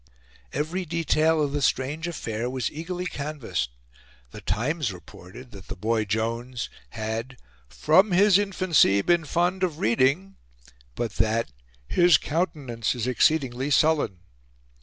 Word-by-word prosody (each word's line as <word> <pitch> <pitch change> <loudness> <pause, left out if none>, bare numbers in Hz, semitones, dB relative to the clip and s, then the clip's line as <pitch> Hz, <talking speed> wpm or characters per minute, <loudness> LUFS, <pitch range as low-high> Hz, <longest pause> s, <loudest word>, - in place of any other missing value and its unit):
Every 160 +6 -2
detail 160 -1 +1
of 145 - -1
the 145 0 -2
strange 140 +6 0
affair 120 -8 -3
was 130 -1 -2
eagerly 175 +4 -5
canvassed. 145 - -3 0.6
The - - -10
Times 140 +2 -1
reported 95 +6 -12
that 100 -2 -12
the - - -6
boy 110 +3 0
Jones 115 +4 -3 0.2
had 115 +3 -5 0.3
"from 185 - +3
his 200 +2 +5
infancy 185 - +3
been 175 -2 +2
fond 175 +5 0
of 175 -5 0
reading," 140 - +1 0.6
but 115 -3 -4
that 110 - +1 0.4
"his 175 -4 +5
countenance 140 -9 -2
is 120 -2 -3
exceedingly 130 0 +1
sullen." 145 - +2
140 Hz, 125 wpm, -25 LUFS, 115-165 Hz, 0.6 s, his